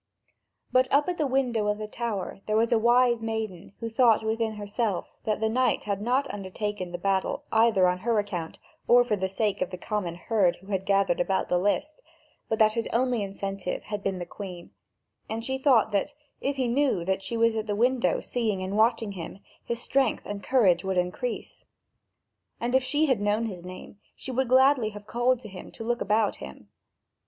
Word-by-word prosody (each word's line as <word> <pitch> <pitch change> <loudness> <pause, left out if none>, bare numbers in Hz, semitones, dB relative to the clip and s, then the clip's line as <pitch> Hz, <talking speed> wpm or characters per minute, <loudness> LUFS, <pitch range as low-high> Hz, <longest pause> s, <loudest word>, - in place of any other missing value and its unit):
But 255 0 +4
up 285 +2 +4
at 355 - -3
the 300 - +2
window 250 -5 +1
of 210 0 +1
the 215 - -5
tower 215 -4 -4
there 215 0 +2
was 230 +1 +2
a 230 - +4
wise 240 0 +4
maiden 220 -5 -4
who 230 - -4
thought 230 -1 +4
within 220 0 -1
herself 210 -1 -3
that 215 -1 0
the 220 - +1
knight 255 +3 +1
had 200 -1 -2
not 255 +5 +1
undertaken 195 -1 -4
the 175 - -4
battle 190 +1 -1
either 220 -4 +4
on 180 0 0
her 230 +3 0
account 185 -6 -3 0.3
or 245 +1 +7
for 225 -3 0
the 190 -1 -2
sake 205 +1 -1
of - - 0
the 180 - -6
common 180 -3 -3
herd 190 -1 +1
who 190 +3 -13
had 195 0 -2
gathered 195 -3 +2
about 190 +2 0
the 180 - +2
list, 250 - -1 0.5
but 220 - 0
that 215 -1 +4
his 230 -1 -2
only 245 -1 +1
incentive 195 -1 -4
had 210 -1 -5
been 195 -1 -2
the 175 - -5
Queen; 180 -1 -9 0.6
and 225 +1 -4
she 265 0 -2
thought 255 -6 +4
that, 205 +9 -1 0.2
if 280 +1 -1
he 260 -2 0
knew 240 -8 +1
that 190 +1 0
she 230 +4 -3
was 230 0 +3
at 220 0 -2
the 205 - -1
window 245 +3 +2
seeing 215 -6 -2
and 190 +2 -3
watching 225 -1 +2
him, 185 -1 -7 0.3
his 235 0 -3
strength 275 0 0
and 205 -1 -5
courage 200 -10 +3
would 190 -1 -1
increase. 180 - -3 1.0
And 240 +1 -2
if 260 0 +4
she 295 +4 +1
had 260 -8 +1
known 210 +2 +1
his 185 -6 -6
name, 185 +3 -10 0.2
she 260 - -6
would 260 +1 0
gladly 260 -3 +5
have 205 - -12
called 240 +3 +1
to 220 - -9
him 190 -3 -10
to - - -8
look 240 +1 -1
about 210 +1 +1
him. 65 0 -11
215 Hz, 205 wpm, -27 LUFS, 195-240 Hz, 1.0 s, or